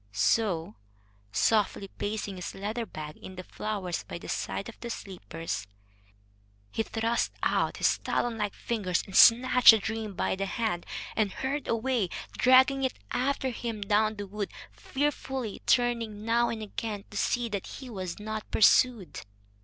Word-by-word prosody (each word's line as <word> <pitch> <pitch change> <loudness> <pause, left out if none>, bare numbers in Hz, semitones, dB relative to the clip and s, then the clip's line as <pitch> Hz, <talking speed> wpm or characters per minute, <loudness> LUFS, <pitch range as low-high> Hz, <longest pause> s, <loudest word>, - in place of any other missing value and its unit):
So, 160 - +1 0.5
softly 205 - +2
placing 205 -2 -4
his 180 - -6
leather 215 +4 -3
bag 155 -1 -8
in 190 - -10
the 185 - -7
flowers 195 -3 -3
by - - -7
the - - -10
side 200 - -3
of 230 - -11
the 235 - -6
sleepers, 165 - -5 1.0
he - - -1
thrust 225 +1 -1
out - - +1
his - - +2
talon 240 -1 -1
like 210 -2 -2
fingers 195 -7 -1
and 195 - -9
snatched 250 +1 +7
the 225 - +11
dream 220 -1 -4
by - - 0
the 195 +1 -2
hand, 215 -5 -2 0.3
and 210 -3 +1
hurried 275 +5 -3
away, 230 -4 0 0.3
dragging 260 +1 +5
it 260 - -1
after 265 +1 0
him 230 -2 -4
down 215 +2 +2
the 205 -1 -5
wood, 200 +1 -4 0.2
fearfully 265 -5 -3
turning 230 -3 +1
now 235 +1 +3
and 220 -1 -4
again 210 -1 -5
to 205 - -6
see 245 +3 +1
that 200 -3 -4
he 265 - -9
was 185 -7 -5
not 215 0 -5
pursued. 215 - +4
215 Hz, 155 wpm, -29 LUFS, 195-235 Hz, 1.0 s, the